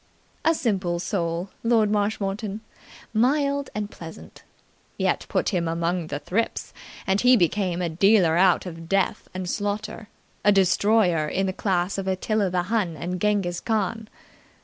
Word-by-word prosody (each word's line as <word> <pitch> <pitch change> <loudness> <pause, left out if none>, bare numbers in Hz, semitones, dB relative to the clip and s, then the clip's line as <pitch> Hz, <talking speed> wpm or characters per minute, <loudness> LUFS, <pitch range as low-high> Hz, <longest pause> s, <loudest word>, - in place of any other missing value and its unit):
A 325 - +3
simple 195 - 0
soul, 170 0 -2
Lord 225 -3 +3
Marshmoreton 205 0 -1 0.5
mild 280 +4 +1
and 210 -1 -3
pleasant. 165 -1 -11 0.6
Yet - - 0
put - - +1
him 175 -5 -1
among 170 +1 -1
the 145 - -3
thrips, 185 +10 -2 0.3
and 190 +1 +1
he 250 0 +6
became 180 -1 +1
a 170 - 0
dealer 180 0 +4
out 180 +1 +4
of 165 -2 -8
death 195 -1 0
and 185 -1 -4
slaughter, 205 +2 -3 0.3
a 205 - +6
destroyer 190 -3 +3
in 195 +5 0
the 190 - -1
class 190 0 -1
of 195 - -4
Attila 195 +2 0
the 180 0 0
Hun 185 -5 -1
and 175 +4 -4
Genghis 200 -4 +1
Khan. 220 0 -2
195 Hz, 150 wpm, -24 LUFS, 175-215 Hz, 0.6 s, he